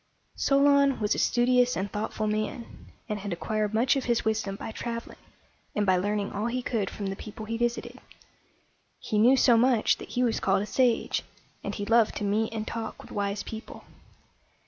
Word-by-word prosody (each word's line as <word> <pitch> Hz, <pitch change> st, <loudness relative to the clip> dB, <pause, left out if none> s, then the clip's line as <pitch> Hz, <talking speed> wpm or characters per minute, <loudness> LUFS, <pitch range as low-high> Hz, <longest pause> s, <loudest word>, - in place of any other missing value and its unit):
Solon 280 Hz, -1 st, +3 dB
was 210 Hz, -1 st, +1 dB
a -, -, -2 dB
studious 250 Hz, +1 st, +3 dB
and 190 Hz, +1 st, -3 dB
thoughtful 215 Hz, 0 st, -3 dB
man, 215 Hz, +2 st, -4 dB, 0.2 s
and 210 Hz, -2 st, -3 dB
had 200 Hz, 0 st, -5 dB
acquired 210 Hz, +4 st, -1 dB
much 240 Hz, +5 st, +3 dB
of 270 Hz, -, -2 dB
his 235 Hz, -2 st, +1 dB
wisdom 220 Hz, -3 st, -1 dB
by 220 Hz, -, -6 dB
traveling, 230 Hz, +1 st, -6 dB, 0.6 s
and 210 Hz, -, +1 dB
by 190 Hz, -1 st, +4 dB
learning 205 Hz, +2 st, -1 dB
all 210 Hz, +3 st, -2 dB
he 250 Hz, +1 st, -2 dB
could 215 Hz, -6 st, -1 dB
from 205 Hz, -, -6 dB
the 195 Hz, 0 st, -2 dB
people 215 Hz, +2 st, -8 dB
he 225 Hz, +1 st, -3 dB
visited. 240 Hz, +1 st, -2 dB, 1.0 s
He 215 Hz, -, -1 dB
knew 250 Hz, +5 st, +6 dB
so 240 Hz, -2 st, +5 dB
much 240 Hz, -1 st, +3 dB
that -, -, -9 dB
he 250 Hz, -, 0 dB
was 235 Hz, -2 st, +1 dB
called 195 Hz, +1 st, +2 dB
a -, -, -3 dB
sage, 245 Hz, +1 st, +1 dB, 0.4 s
and -, -, -4 dB
he 205 Hz, -, -4 dB
loved 225 Hz, 0 st, +3 dB
to -, -, -3 dB
meet 215 Hz, +2 st, 0 dB
and 220 Hz, -1 st, -4 dB
talk 225 Hz, -1 st, -5 dB
with -, -, -14 dB
wise 200 Hz, 0 st, -2 dB
people. 220 Hz, +1 st, -9 dB
220 Hz, 190 wpm, -27 LUFS, 210-240 Hz, 1.0 s, knew